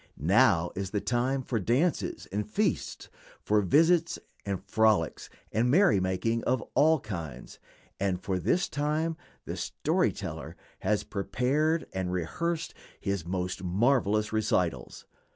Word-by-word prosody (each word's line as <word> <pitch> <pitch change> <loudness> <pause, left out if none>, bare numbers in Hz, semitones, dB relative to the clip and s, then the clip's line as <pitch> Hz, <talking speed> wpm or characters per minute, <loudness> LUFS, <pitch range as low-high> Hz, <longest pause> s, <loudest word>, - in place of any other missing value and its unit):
Now 90 - +3
is 95 0 -4
the 105 - -1
time 125 +5 0
for 120 -2 -1
dances 130 - 0
and 105 +1 -2
feasts, 105 - -1 0.3
for 105 0 +2
visits 165 - +3 0.3
and 100 -2 -1
frolics 110 -6 +1 0.2
and 115 +3 +1
merry 180 - +5
making 95 +5 -1
of 130 -1 +1
all 160 +1 +4
kinds, 85 - -7 0.4
and 95 -2 0
for 95 -1 -2
this 175 - +1
time 155 +3 -1 0.3
the - - -4
"story - - 0
teller" - - -7 0.2
has 105 +2 0
prepared 135 +11 0
and 95 -1 -2
rehearsed 165 - -2 0.3
his 100 -4 -3
most 90 +1 -3
marvelous 105 +2 +2
recitals. 90 - -1
105 Hz, 130 wpm, -29 LUFS, 95-135 Hz, 0.4 s, merry